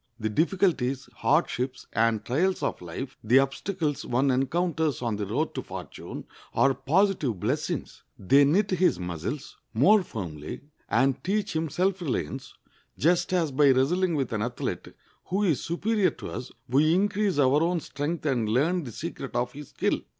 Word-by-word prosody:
The 110 -1 -1
difficulties, 155 - +1
hardships, 135 -4 0
and 115 -1 +1
trials 180 +9 +1
of - - -2
life—the 120 +6 -1
obstacles 145 +2 0
one 130 +3 +1
encounters 160 +2 0
on 115 -3 0
the 100 -1 -3
road - - -1
to - - -3
fortune—are 135 0 -3
positive 155 - +1
blessings. - - -2 0.2
They 135 +9 +5
knit 195 +8 +2
his 180 - +2
muscles 90 - -5 0.2
more 200 - +6
firmly, 85 - -6 0.3
and 135 0 +2
teach 200 -1 -1
him 160 0 0
self 185 +5 0
reliance, 130 - -3 0.4
just 175 +5 +2
as 170 -5 +1
by 140 +1 +4
wrestling 165 +7 +2
with 135 -5 -1
an 105 - -1
athlete 120 +2 -3 0.4
who 195 +4 0
is 165 -9 +2
superior 205 +4 +1
to - - -8
us 125 - -6 0.2
we 150 +6 +3
increase 200 -1 +1
our 140 +1 +4
own 170 +1 +1
strength 145 +4 -4
and 120 -7 +1
learn 160 +10 +2
the 120 - -6
secret 135 -1 -6
of 120 0 0
his 145 0 -9
skill. - - 0
145 Hz, 155 wpm, -27 LUFS, 125-175 Hz, 0.4 s, more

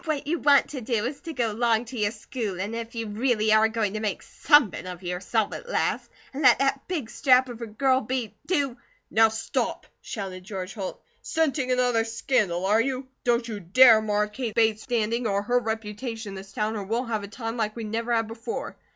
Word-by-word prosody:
What 305 -3 -2
you 325 +3 -1
want 285 -1 +5
to 270 -3 -6
do 230 -2 -1
is 270 +3 -4
to 330 -2 -6
go 235 -5 0
long 230 +1 +1
to 250 - -9
your 210 -3 +1
schoolin', 210 -3 -4
if 230 0 -6
you 230 -1 -3
reely 215 0 +1
are 215 0 +6
going 220 -3 -1
to 215 - -2
make 210 -3 -3
somepin 280 - +3
of 180 0 -8
yourself 185 +5 -1
at 485 - -8
last, - - -1 0.2
an' 275 - -4
let - - +7
that 275 0 0
big 320 -10 -3
strap 255 +1 +3
of 240 -1 -8
a 230 - -4
girl 260 +4 +2
be, 245 -1 -3
do 280 -8 0 0.2
" - - -41
"Now, 225 0 +5
stop!" 220 +1 -2 0.2
shouted 190 -3 -6
George 190 -1 -6
Holt. 195 -4 -5 0.2
"Scenting 295 -5 0
another 245 -2 +2
scandal, 215 -6 0
are 210 +3 +4
you? 260 +1 -3
Don't 240 -1 +1
you 215 -3 -5
dare 220 +5 +7
mar 210 -1 +1
Kate 220 +1 -5
Bates' 220 -2 +3
standing, 230 -1 -1
or 200 -1 0
her 245 +3 +2
reputation 225 0 -4
in - - -7
this 195 +1 -9
town, 215 +2 -1
or 205 - -3
we'll 230 +6 -1
have 225 -3 -2
a 200 - -7
time 225 +2 -5
like 215 -2 -2
we 230 - -5
never 230 +2 -3
had 225 -1 +2
before. 230 +1 -5
225 Hz, 215 wpm, -26 LUFS, 210-250 Hz, 0.2 s, let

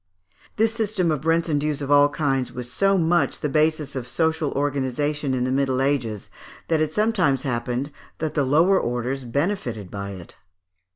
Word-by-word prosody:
This 225 +1 +2
system 210 -6 0
of 155 +1 -3
rents 165 +1 +2
and 145 -3 0
dues 150 -1 -1
of 140 -1 -3
all 145 0 +6
kinds 135 -4 -1
was 125 -1 -6
so 195 +5 +2
much 170 0 +1
the 150 - 0
basis 155 -1 +1
of 125 -2 -4
social 160 +2 0
organization 145 0 -1
in 125 - 0
the 130 - -1
Middle 135 -1 +1
Ages, 125 -7 -1 0.4
that 160 -2 +2
it 155 -1 0
sometimes 185 - +1
happened 125 +2 -2 0.3
that 155 -1 -3
the 145 - +1
lower 165 +8 +4
orders 125 +2 -2
benefited 120 - -2
by 100 0 -5
it. 90 -3 -11
145 Hz, 175 wpm, -23 LUFS, 130-160 Hz, 0.4 s, all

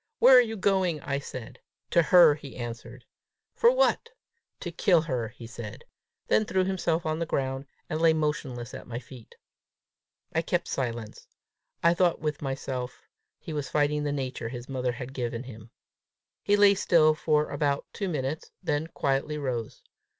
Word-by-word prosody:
"Where 265 - +8
are 250 - +10
you 225 -2 -3
going?" 190 -5 +1
I 140 0 -2
said. 130 -4 -8 0.3
"To 170 - +5
her" 165 0 +7
he 145 -2 -10
answered. 120 +1 -7 0.5
"What 485 0 +4
for?" - - -33 0.5
"To 175 - -4
kill 170 0 +3
her," 130 -8 -2
he 115 +1 -12
said 115 -2 -8 0.4
then 215 - +3
threw 190 -2 +1
himself 175 -3 0
on 155 0 -1
the 170 - -2
ground, 135 -1 -2 0.2
and 155 +1 -3
lay 165 -1 +6
motionless 145 -6 -2
at - - -8
my 120 -1 -5
feet. 125 -1 -12 1.0
I 165 - +2
kept 175 +1 -1
silence. 120 -4 -4 0.6
I 170 0 +6
thought 175 -1 +2
with 150 -2 -3
myself 135 -2 -4 0.3
he 160 - -8
was 145 -2 -3
fighting 150 0 +1
the 145 - -1
nature 130 -4 -3
his 120 0 -7
mother 130 -2 -1
had 125 +2 -7
given 120 -2 -3
him. 115 -3 -11 0.7
He 205 - +3
lay 205 -1 +6
still 165 -5 +4
for 150 -1 +1
about 145 -1 0
two 195 -2 -3
minutes, 145 -1 -3
then 150 +2 -1
quietly 140 0 -1
rose. 125 -6 -4
145 Hz, 165 wpm, -27 LUFS, 125-170 Hz, 1.0 s, are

